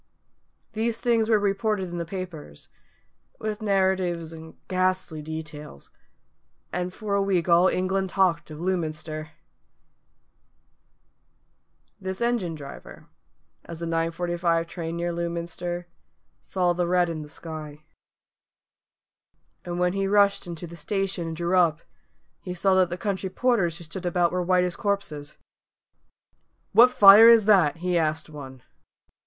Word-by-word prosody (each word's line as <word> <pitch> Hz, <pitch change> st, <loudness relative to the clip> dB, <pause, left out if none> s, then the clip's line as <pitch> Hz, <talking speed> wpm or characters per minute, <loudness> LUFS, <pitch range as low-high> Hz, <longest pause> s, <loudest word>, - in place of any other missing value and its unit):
These 225 Hz, +1 st, -1 dB
things 230 Hz, -3 st, +1 dB
were 220 Hz, -, +5 dB
reported 205 Hz, -1 st, -1 dB
in 175 Hz, 0 st, -5 dB
the 170 Hz, -, -3 dB
papers, 170 Hz, -, -8 dB, 0.7 s
with 215 Hz, 0 st, -4 dB
narratives 190 Hz, -5 st, 0 dB
and 160 Hz, 0 st, -11 dB
ghastly 185 Hz, -3 st, -1 dB
details, 155 Hz, -, -8 dB, 0.8 s
and 180 Hz, +1 st, -2 dB
for 205 Hz, +2 st, -5 dB
a 200 Hz, -, +2 dB
week 190 Hz, -3 st, 0 dB
all 175 Hz, +1 st, +5 dB
England 190 Hz, +1 st, 0 dB
talked 185 Hz, -5 st, +1 dB
of 155 Hz, 0 st, -9 dB
Lewminster. 155 Hz, -3 st, -3 dB, 2.7 s
This 190 Hz, -1 st, -5 dB
engine 235 Hz, -9 st, -1 dB
driver, 140 Hz, -2 st, -11 dB, 0.6 s
as 170 Hz, -1 st, -9 dB
the -, -, -2 dB
9.45 165 Hz, 0 st, 0 dB
train 170 Hz, -1 st, -5 dB
neared 170 Hz, 0 st, -2 dB
Lewminster, 170 Hz, +1 st, -4 dB, 0.6 s
saw 180 Hz, -2 st, 0 dB
the 175 Hz, 0 st, -1 dB
red 180 Hz, 0 st, +3 dB
in 165 Hz, -2 st, -4 dB
the 150 Hz, -, -10 dB
sky. 155 Hz, -2 st, -8 dB, 1.8 s
And 175 Hz, 0 st, -5 dB
when 180 Hz, 0 st, +1 dB
he 195 Hz, 0 st, -1 dB
rushed 200 Hz, -1 st, +3 dB
into 170 Hz, 0 st, -6 dB
the 170 Hz, 0 st, -10 dB
station 195 Hz, -3 st, -2 dB
and 160 Hz, -1 st, -5 dB
drew 175 Hz, +2 st, 0 dB
up, 170 Hz, -4 st, +3 dB, 0.6 s
he 180 Hz, -, -6 dB
saw 190 Hz, +2 st, +2 dB
that 185 Hz, -2 st, +3 dB
the 175 Hz, -, -4 dB
country 195 Hz, -1 st, -3 dB
porters 190 Hz, -6 st, +1 dB
who 170 Hz, -, -11 dB
stood 175 Hz, +3 st, -6 dB
about 175 Hz, 0 st, +1 dB
were 180 Hz, -, -1 dB
white 180 Hz, 0 st, +2 dB
as 180 Hz, -1 st, -2 dB
corpses. 155 Hz, -8 st, -3 dB, 1.3 s
"What 245 Hz, +2 st, +7 dB
fire 210 Hz, -1 st, +9 dB
is 230 Hz, -3 st, +6 dB
that?" 185 Hz, -9 st, +4 dB
he 180 Hz, -1 st, +2 dB
asked 155 Hz, 0 st, -1 dB
one. 130 Hz, -4 st, -10 dB
175 Hz, 135 wpm, -25 LUFS, 165-195 Hz, 2.7 s, fire